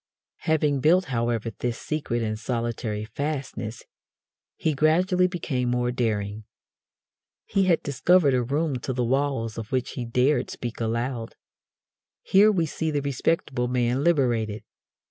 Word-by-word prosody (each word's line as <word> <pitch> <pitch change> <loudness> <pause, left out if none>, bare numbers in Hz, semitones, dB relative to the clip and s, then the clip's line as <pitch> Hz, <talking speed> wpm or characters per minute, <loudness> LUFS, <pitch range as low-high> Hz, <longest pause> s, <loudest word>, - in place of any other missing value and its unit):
Having 150 -3 +2
built, 175 +7 +4
however, 115 -1 0
this 120 -1 -2
secret 130 -7 -2
and 110 -1 -2
solitary 115 -2 -2
fastness, 130 -2 -4 0.7
he 160 - 0
gradually 180 +5 +3
became 140 -9 -2
more 125 0 +1
daring. 110 -3 -2 1.0
He 195 -1 +1
had 175 -3 +2
discovered 145 +2 +3
a 125 - +3
room 140 +3 -1
to 130 +2 -4
the 125 -1 0
walls 130 -3 0
of 110 -1 -7
which 130 -1 -1
he 125 - -4
dared 125 +5 +2
speak 120 -1 -6
aloud. 115 +1 -2 0.9
Here 205 +3 +5
we 175 -5 +1
see 160 +1 -2
the 145 -2 -1
respectable 135 -2 0
man 125 +2 +1
liberated. 120 -9 +1
125 Hz, 135 wpm, -25 LUFS, 115-155 Hz, 1.0 s, Here